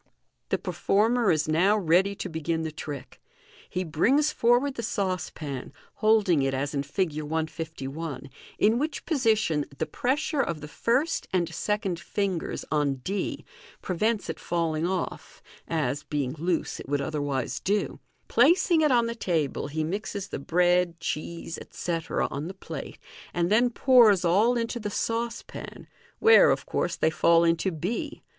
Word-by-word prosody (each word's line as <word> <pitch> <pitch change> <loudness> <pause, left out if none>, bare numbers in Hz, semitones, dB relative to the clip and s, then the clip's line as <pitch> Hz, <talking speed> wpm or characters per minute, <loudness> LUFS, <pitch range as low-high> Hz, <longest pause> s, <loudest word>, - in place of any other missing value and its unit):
The - - +1
performer 225 +2 +1
is 155 -1 +2
now 180 +7 +3
ready 190 +2 +3
to 190 - -5
begin 160 -1 -2
the 160 - -3
trick. 145 -3 -8 0.5
He 185 - -2
brings 260 - +2
for 240 -2 +4
ward 280 +2 -1
the 235 - -5
saucepan, 180 - -3 0.3
holding 210 -8 +3
it 135 0 0
as 140 +2 -2
in 140 - 0
Fig. 160 +5 -1
1^1, 155 -1 -4 0.3
in 220 +3 +3
which 300 +1 -3
position 220 - +2
the - - -1
pressure 280 +3 0
of 170 -10 -2
the 150 - -8
first 250 - 0
and 175 -3 0
second 195 0 -1
fingers 190 -1 -2
on 145 -3 +1
d 195 +5 -3 0.4
prevents 210 +3 0
it - - -5
fall 170 -2 -1
ing 155 +2 -1
off, 185 -1 -4 0.3
as, 145 -4 -1
being 140 -4 -2
loose, 170 0 -1
it - - -9
would 145 0 +1
otherwise 145 -2 -2
do 205 +1 -1 0.3
Placing 345 -1 +4
it 300 -2 +3
on 240 -2 +4
the 230 - -2
table, 165 - -1
he 155 +2 -2
mixes 200 +3 -4
the - - -4
bread, 175 +2 +2
cheese, 165 +2 -4
etc., 165 -2 -2
on 145 +3 -4
the 190 - -7
plate, - - -7 0.4
and 175 +2 +1
then 240 +3 +4
pours 230 -7 +5
all 215 +8 +3
into 235 +1 -2
the 210 -2 -3
saucepan, 230 +2 -4 0.3
where, 455 +1 +7
of - - 0
course, - - -1
they 160 - +1
fall 170 +1 +4
into 165 +2 +2
b. 180 +8 -4
175 Hz, 155 wpm, -27 LUFS, 155-220 Hz, 0.5 s, where